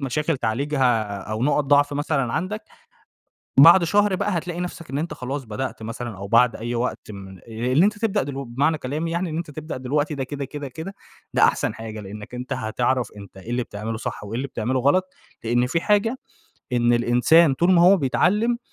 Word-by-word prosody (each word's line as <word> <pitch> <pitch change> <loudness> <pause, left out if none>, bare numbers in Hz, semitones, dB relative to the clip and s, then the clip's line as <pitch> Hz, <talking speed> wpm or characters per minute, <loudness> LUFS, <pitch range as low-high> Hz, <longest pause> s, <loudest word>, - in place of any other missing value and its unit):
مشاكل 145 +3 -1
تعالجها 120 -3 0
أو 110 +3 -4
نُقَط 145 +1 +2
ضعف 145 +1 +3
مثلًا 145 -4 -1
عندك، 210 +5 -3 1.0
بعد 170 +5 +9
شهر 205 +2 +2
بقى 185 -1 -1
هتلاقي 175 +1 -4
نفسك 175 -2 -6
إن 135 - -3
أنت 165 +3 -3
خلاص 135 +2 -5
بدأت 115 +1 -5
مثلًا 115 -2 -6
أو 100 +1 -6
بعد 115 +2 +4
أي 120 +2 -4
وقت 120 -2 -3
من 95 -1 -10
آآ، - - -22
اللي 125 - +2
أنت 210 0 0
تبدأ 210 -7 0
دلو 140 0 -5
بمعنى 140 +6 0
كلامي 155 +5 -3
يعني، 170 +1 -1
إن 155 - -4
أنت 165 -3 -5
تبدأ 155 -1 -6
دلوقتي 145 +4 -1
ده 135 - -2
كده، 140 +1 -5
كده، 145 0 -7
كده 160 +10 -8 0.4
ده - - +3
أحسن - - +2
حاجة، 110 -1 -7
لإنّك 105 +4 -9
أنت 125 +1 -4
هتعرف 120 +2 -1
أنت 100 -1 -12
إيه 105 +5 -11
اللي 125 0 0
بتعمله 110 +1 -5
صح 120 -2 -5
وإيه 105 +2 -6
اللي 140 +2 -3
بتعمله 130 +2 -2
غلط، 185 +8 +2 0.3
لإن 120 +2 +1
في 165 +6 0
حاجة 210 +5 +2 0.6
إن 120 0 +3
الإنسان 125 +6 +4
طول 175 +6 +3
ما 170 -1 +5
هو 190 +3 +7
بيتعلّم، 210 - +1
135 Hz, 200 wpm, -23 LUFS, 120-165 Hz, 1.0 s, بعد